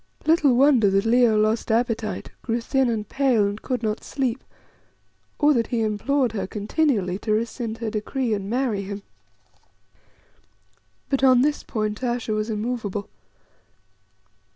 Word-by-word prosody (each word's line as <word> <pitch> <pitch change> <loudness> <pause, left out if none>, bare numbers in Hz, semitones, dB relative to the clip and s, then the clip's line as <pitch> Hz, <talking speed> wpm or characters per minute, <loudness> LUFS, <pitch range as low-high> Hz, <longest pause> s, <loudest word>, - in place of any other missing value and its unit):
Little 310 -5 +4
wonder 255 -5 +5
that 195 +2 +1
Leo 235 -1 +4
lost 215 +2 +1
appetite, 230 -1 -1
grew 230 0 -1
thin 265 +2 +1
and 215 -3 -2
pale, 260 -6 +2
and 205 +1 -3
could 250 -3 -3
not 215 0 -2
sleep, 260 -3 -2 0.9
or 295 0 +4
that 235 -4 +1
he 235 -2 -1
implored 235 +4 0
her 195 -4 -3
continually 205 - 0
to 215 - -3
rescind 230 +1 -2
her 225 -2 -4
decree 225 +3 -2
and 200 -1 -3
marry 240 -4 0
him. 200 +1 -6 2.0
But 270 -1 -1
on 255 -2 +6
this 295 +1 0
point 215 0 -3
Ayesha 240 -2 -1
was 215 +1 -1
immovable. 215 -2 -3
230 Hz, 140 wpm, -23 LUFS, 215-255 Hz, 2.0 s, on